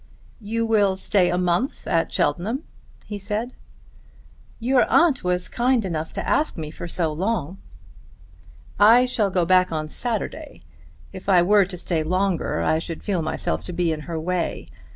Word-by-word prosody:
"You 230 +1 -2
will 205 -4 +3
stay 190 -1 +2
a 180 - 0
month 180 +8 -1
at 165 -1 0
Cheltenham?" 200 - -1 0.4
he 205 -1 -6
said. 215 +5 -3 1.1
"Your 250 +2 +2
aunt 335 - +3
was 180 0 0
kind 245 -2 +1
enough 160 -3 -3
to - - -4
ask 305 - +1
me 155 -2 -5
for 170 - -7
so 165 -2 0
long." 190 0 -2 1.2
"I 230 +5 +7
shall 225 -5 0
go 180 -2 +1
back 185 +1 +3
on 155 -1 -2
Saturday. 235 +7 -4 0.5
If 190 +1 -7
I 180 -3 +6
were 200 +1 +4
to 180 -1 -7
stay 170 -2 -1
longer 185 - 0
I 160 - +2
should 165 0 -6
feel 190 -5 -1
myself 85 - -2
to - - -5
be 170 -1 0
in 155 - -3
her 165 -1 -3
way. 175 +1 -2
185 Hz, 165 wpm, -23 LUFS, 170-220 Hz, 1.2 s, I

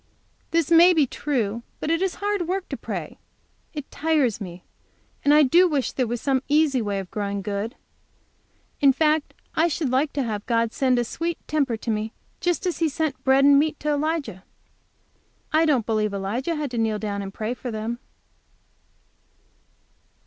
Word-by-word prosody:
'" - - -40
"This 335 -1 +1
may 340 +2 +8
be 305 -3 +4
true, 235 -5 -2 0.2
but 310 - -2
it 330 +1 +1
is 380 -2 0
hard 405 -4 -1
work 375 +1 -2
to - - -3
pray. - - -6 0.5
It 295 -3 -7
tires 290 -9 +1
me. 175 -2 -8 0.6
And 285 - +4
I 300 0 +7
do 345 +7 +5
wish 285 -5 0
there 255 -2 -1
was 240 +1 -2
some 265 0 +1
easy 290 -3 +3
way 205 -2 -2
of 190 -3 -6
growing 200 -1 -3
good. 205 +3 -3 1.0
In 275 -2 +5
fact 305 +2 +1 0.2
I 325 +2 +4
should 300 -5 -1
like 275 +3 +2
to 280 - 0
have 210 -4 -3
God 230 -1 +1
send 255 -2 +2
a 240 - +2
sweet 335 +8 -3
temper 280 -6 0
to 225 - -3
me 215 +1 -2 0.3
just 350 +2 0
as 360 - -1
He 325 -2 +2
sent 305 -1 -2
bread 270 +1 +4
and 280 0 +7
meat 305 0 0
to 300 - -1
Elijah. 290 - -2 1.1
I 315 +1 +4
don't 260 -8 +2
believe 215 -2 0
Elijah 230 - -2
had 295 -4 -3
to 240 - -2
kneel 220 -1 +1
down 205 -1 -3
and 195 -1 -6
pray 215 +3 -3
for 250 0 -6
them." 225 +2 -4
270 Hz, 185 wpm, -24 LUFS, 220-315 Hz, 1.1 s, may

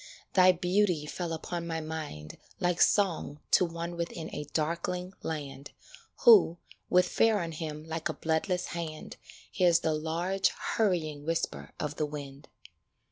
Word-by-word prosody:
Thy 185 -1 +7
beauty 180 -2 +1
fell 170 +2 -4
upon 170 +1 -4
my 165 -1 -2
mind 155 - -6 0.2
Like 175 -1 +1
song 175 -7 +2
to 180 - +5
one 170 0 -5
within 170 -1 -5
a 150 - -4
darkling 170 +3 -2
land 145 -3 -6 0.5
Who, 425 - +7 0.3
with 180 0 +4
fear 225 -1 +3
on 170 -2 -3
him 155 -1 -5
like 160 +1 -3
a - - -1
bloodless 165 +4 -1
hand, 160 -2 -6 0.3
Hears 175 -2 +4
the 160 - +1
large, 170 +5 0
hurrying 160 -9 -1
whisper 150 - -3
of 150 -1 -3
the 155 - 0
wind. 140 -1 -8
165 Hz, 140 wpm, -30 LUFS, 155-180 Hz, 0.5 s, Thy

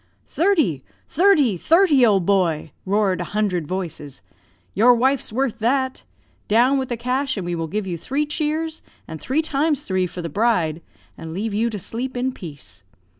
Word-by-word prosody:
"'Thirty! 315 - +1 0.2
thirty! 310 - +3
thirty! 320 - +4
old 200 -6 +4
boy!' 170 -6 +1 0.2
roared 200 -1 +1
a 210 - -5
hundred 180 -7 0
voices. 165 -6 -6 0.5
'Your 240 +4 +5
wife's 260 +1 +1
worth 240 -1 -1
that. 260 +3 0 0.4
Down 245 +6 +3
with 260 - -4
the 240 - -2
cash, 255 +2 -1
and 190 - -4
we 175 - -2
will 165 -1 -3
give 205 +4 -3
you 175 -3 -4
three 275 - -1
cheers, 310 +1 -2 0.3
and 160 -1 -8
three 295 +5 0
times 295 -1 0
three 185 -1 0
for 175 0 -7
the - - -3
bride, 180 -6 0 0.4
and 160 0 -7
leave 210 +2 -3
you 225 +3 +1
to 215 - -5
sleep 245 +7 -5
in 255 +1 0
peace. 145 - -11
225 Hz, 175 wpm, -21 LUFS, 180-270 Hz, 0.5 s, Your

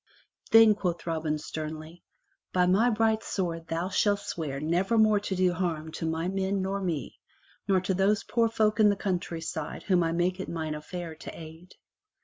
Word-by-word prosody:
"Then," 225 -1 +8
quoth 180 -4 -3
Robin 160 -2 -1
sternly, 155 +2 -7 0.5
"by 180 -1 +3
my 200 +7 +4
bright 220 -1 +2
sword 165 -6 -3
thou 165 +3 -2
shalt 205 +1 +2
swear 145 -5 -4
never 175 +9 +1
more 215 -1 +5
to 200 -1 -3
do 180 -1 +2
harm 165 -3 -2
to 160 +1 -4
my 160 +2 -1
men 195 +1 -1
nor 195 +1 -2
me, 165 -7 -3 0.5
nor 190 -1 +4
to 185 +1 -1
those 195 +3 +2
poor 230 -1 +1
folk 215 -1 +1
in 210 -1 +6
the 205 - +2
countryside 170 -5 -4
whom 185 -3 +2
I 165 -1 +1
make 175 +2 0
it 190 - -5
mine 160 -2 -3
affair 165 +2 -6
to - - -9
aid." 160 +3 -12
180 Hz, 180 wpm, -28 LUFS, 165-200 Hz, 0.5 s, Then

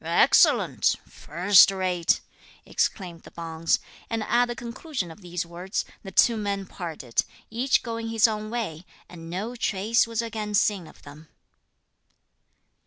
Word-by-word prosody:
"Excellent! - - +4
first 180 +4 +5
rate!" 185 -3 0 0.4
exclaimed 175 -5 -2
the - - -14
Bonze. 165 -1 -1 0.3
And 225 -1 -1
at 245 +3 +2
the 240 - -4
conclusion 235 - -5
of 160 - -14
these 175 -1 -4
words, 175 +3 -4 0.2
the 195 - -8
two 230 +4 +4
men 200 -2 -2
parted, 160 -10 -3 0.3
each 250 +4 +1
going 230 -1 -4
his 225 0 +4
own 215 -1 -4
way, 210 -9 -4 0.2
and 165 -2 -11
no 205 +8 -4
trace 220 +1 +1
was 230 0 -2
again 215 -2 -4
seen 200 -4 +1
of - - -17
them. 150 +2 -13
200 Hz, 140 wpm, -25 LUFS, 170-230 Hz, 0.4 s, first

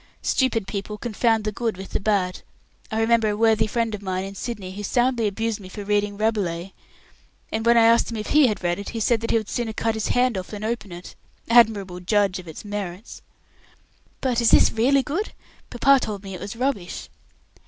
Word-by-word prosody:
"Stupid 235 -6 +1
people 200 +2 -5
confound 225 0 +1
the 215 - -1
good 225 -2 -2
with 190 0 -8
the - - -1
bad. 195 -3 0 0.5
I 220 -2 -2
remember 225 -1 +3
a 205 - -2
worthy 220 -1 +3
friend 230 0 -1
of 210 - -5
mine 185 -1 -2
in 195 - -7
Sydney 200 -2 -6
who 200 +2 -7
soundly 240 +1 +1
abused 220 +2 -2
me 185 -2 -11
for 205 +2 -7
reading 205 0 0
'Rabelais', 195 -5 -1 0.8
and 220 0 -2
when 235 0 +6
I 230 - +6
asked 230 +1 +4
him 230 - -4
if 215 - -5
he 300 -3 +6
had 210 -5 -3
read 175 +2 0
it, 200 - -6
he 230 - -4
said 225 +1 +2
that 230 - -3
he - - +3
would 215 -2 -3
sooner 235 -2 -3
cut 225 +1 0
his 220 -1 -2
hand 245 -5 +2
off 185 - -7
than 210 -1 -7
open 220 -3 -3
it. 175 +1 -9 0.4
Admirable 205 -6 +4
judge 195 0 +1
of 180 - -11
its 160 +6 -9
merits!" 205 0 -6 1.0
"But 245 -3 +1
is 235 - +4
this - - +6
really 265 +5 +3
good? 345 +11 -3 0.4
Papa 270 +3 +4
told 210 -4 -5
me 195 -1 -7
it 180 - -7
was 205 - -6
rubbish." 240 -8 -3
215 Hz, 215 wpm, -23 LUFS, 195-230 Hz, 1.0 s, when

